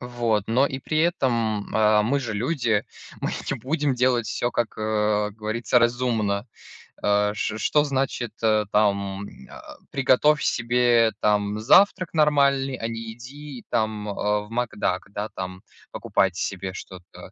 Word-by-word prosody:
Вот, 120 -4 -1
но 125 +5 +3
и 135 -1 -5
при 155 +3 -2
этом, 120 - 0
а, 105 -1 +4
мы 130 +7 +1
же 115 -5 -4
люди, 120 -2 0 0.4
мы - - -1 0.2
не - - -1
будем 145 0 -1
делать 125 -2 +1
всё, 120 +4 -2
как, 120 -2 -2
э, 105 -1 0
говорится, 110 +3 0
разумно. 120 -3 0 0.6
А 105 0 +2
ш 110 0 -3
что 150 +6 +2
значит, 135 -4 -2
э, 110 -1 +2
там, 100 -2 +1
м, 65 - -15
а, - - -12 0.2
приготовь 140 +3 +3
себе 120 -1 +2
там 105 0 +1
завтрак 185 - +4
нормальный, 140 -3 +2
а 115 - -3
не 115 -1 -6
иди 135 +2 -10
там, 110 -1 -1
а, 105 +1 -1
в 105 - -12
макдак, 115 -6 -2
да, 105 +1 -4
там 95 0 -6 0.3
покупать 95 -3 0
себе 95 0 -3
что-то. 90 -1 -11
115 Hz, 150 wpm, -24 LUFS, 105-130 Hz, 0.6 s, а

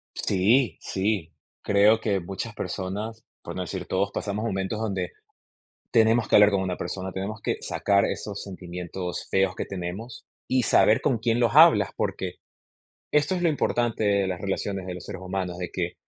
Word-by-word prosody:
Sí, 110 +7 +2
sí. 95 -4 -2 0.3
Creo 105 +2 +5
que 100 -3 +1
muchas 95 +5 -5
personas, 105 +5 -4 0.2
por 85 - -7
no 95 - -3
decir 90 0 -4
todos, 100 +2 0
pasamos 105 +1 -3
momentos 95 0 -2
donde 95 -5 -2 0.8
tenemos 115 0 +4
que - - +5
hablar 105 0 +7
con 100 -2 +1
una 90 -1 -2
persona. 95 0 -5
Tenemos 100 +3 -4
que - - -1
sacar 100 0 +1
esos 100 -1 -4
sentimientos 90 -1 -6
feos 95 -1 +2
que - - -2
tenemos, 95 +6 -6 0.2
y 130 -1 +2
saber 110 - +5
con 130 -5 +1
quién 115 +2 +1
los 120 +2 +2
hablas, 165 +2 +7
porque - - -2 0.8
esto 150 +5 +2
es 180 - -2
lo 175 - +3
importante 120 -6 0
de 100 -1 +2
las 90 -2 -3
relaciones 95 0 -3
de 90 - -4
los 90 - -8
seres - - -7
humanos, 95 -1 -3
de 90 -1 -4
que 90 -1 -2
100 Hz, 175 wpm, -26 LUFS, 95-110 Hz, 0.8 s, hablar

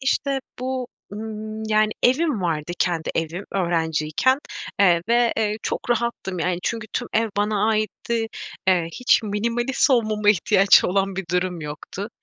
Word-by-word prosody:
işte, 275 0 0 0.2
bu, 255 0 -3 0.2
ımm, 215 0 -6
yani 215 0 +3
Evim 260 - +2
vardı, 165 -1 -1
kendi 170 -3 0
evim 165 +4 -2
öğrenciyken, 170 - +1 0.4
eee, 175 -4 +5
ve, 235 0 +3
eee, 215 -1 0
çok - - -3
rahattım, 235 -6 -1
yani, 175 +1 0
çünkü 230 -2 -2
tüm - - -2
ev 225 0 +2
bana 210 +1 +1
aitti, 225 +1 -1 0.4
eee, 175 -3 +3
hiç 250 +5 +3
minimalist 235 +6 0
olmama 215 -4 +3
ihtiyaç 195 0 +5
olan 195 0 0
bir 195 - -3
durum 180 -1 -1
yoktu. 150 +7 -6
210 Hz, 140 wpm, -23 LUFS, 180-235 Hz, 0.4 s, eee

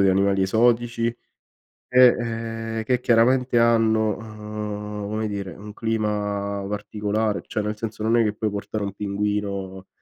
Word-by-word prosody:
di 100 - +5
animali 95 0 +3
esotici 115 +3 +2 0.8
e, 125 0 +7
ehm, 115 -1 -2
che 125 +2 +1
chiaramente 125 +1 +3
hanno, 110 -2 +3
uhm, 105 -1 -6
come 110 0 -1
dire, 100 -2 -4
un 105 +3 -10
clima 105 -3 -1
particolare, 105 +1 -1
cioè 110 - -2
nel 105 0 -3
senso 110 -1 -5
non 115 +2 +3
è 115 - +5
che 105 - 0
puoi 105 0 -1
portare 100 +1 -4
un 100 -1 -3
pinguino, 100 -2 -3
105 Hz, 145 wpm, -24 LUFS, 100-115 Hz, 0.8 s, e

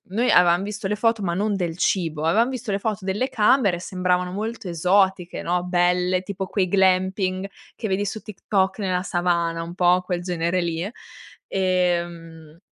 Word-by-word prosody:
noi 240 +3 +2
avevam 175 +1 +5
visto 210 +1 -6
le 210 - -1
foto, 225 0 +1
ma 175 -3 -1
non 205 +3 0
del 175 -3 -3
cibo, 165 -5 0
avevam 225 +9 +3
visto 250 -5 -4
le 195 - 0
foto 205 -3 -3
delle 205 +7 -1
camere, 210 -5 +3
sembravano 180 0 -1
molto 220 +1 -4
esotiche, 180 +1 +1
no, 175 +1 -1
belle, 180 +1 +1
tipo 190 0 -4
quei 185 0 0
glamping 190 0 +1 0.3
che 220 - -3
vedi 195 +1 0
su 205 +2 -4
TikTok 195 -1 -1
nella 185 -3 0
savana, 170 -2 0
un 170 +1 -8
po' 180 0 +3
quel 180 -1 -3
genere 175 0 -1
lì. 170 +2 -2 0.6
Ehm 170 -4 -1
185 Hz, 165 wpm, -23 LUFS, 175-200 Hz, 0.6 s, avevam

